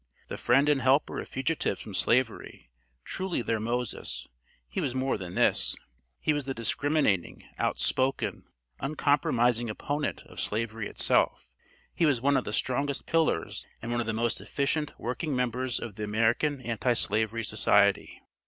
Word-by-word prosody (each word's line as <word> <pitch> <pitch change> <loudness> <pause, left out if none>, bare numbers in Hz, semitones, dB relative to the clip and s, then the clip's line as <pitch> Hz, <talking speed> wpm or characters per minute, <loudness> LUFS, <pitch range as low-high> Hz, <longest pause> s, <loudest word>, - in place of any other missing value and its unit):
The - - -5
friend 135 +4 +3
and 145 -2 +3
helper 130 +3 +2
of - - -7
fugitives 135 +5 -1
from 105 - -8
Slavery, 115 - 0 0.3
truly 185 - -3
their 115 -1 -1
Moses, 120 +1 -3 0.4
he - - -3
was 130 -3 -2
more 130 +1 0
than 90 -2 -7
this, - - +3 0.4
he 155 - +1
was 145 -2 -2
the 135 -1 -3
discriminating, 115 - 0 0.2
outspoken, 130 +1 0 0.3
uncompromising 125 -5 +1
opponent 145 +7 -3
of - - -11
Slavery 110 0 -1
itself. - - +2 0.4
He 165 - +2
was 140 -5 +2
one 140 +3 +2
of 130 - +1
the - - -4
strongest 140 +4 0
pillars 160 - 0 0.2
and 115 - -5
one 120 0 0
of 115 - -4
the - - +1
most 115 +1 -1
efficient 150 +1 -1
working 135 +5 -3
members 125 0 0
of 115 - -6
the 105 +2 -6
American 115 +7 +1
Anti 120 +1 0
slavery 110 0 +1
Society. - - +2
125 Hz, 155 wpm, -28 LUFS, 115-140 Hz, 0.4 s, friend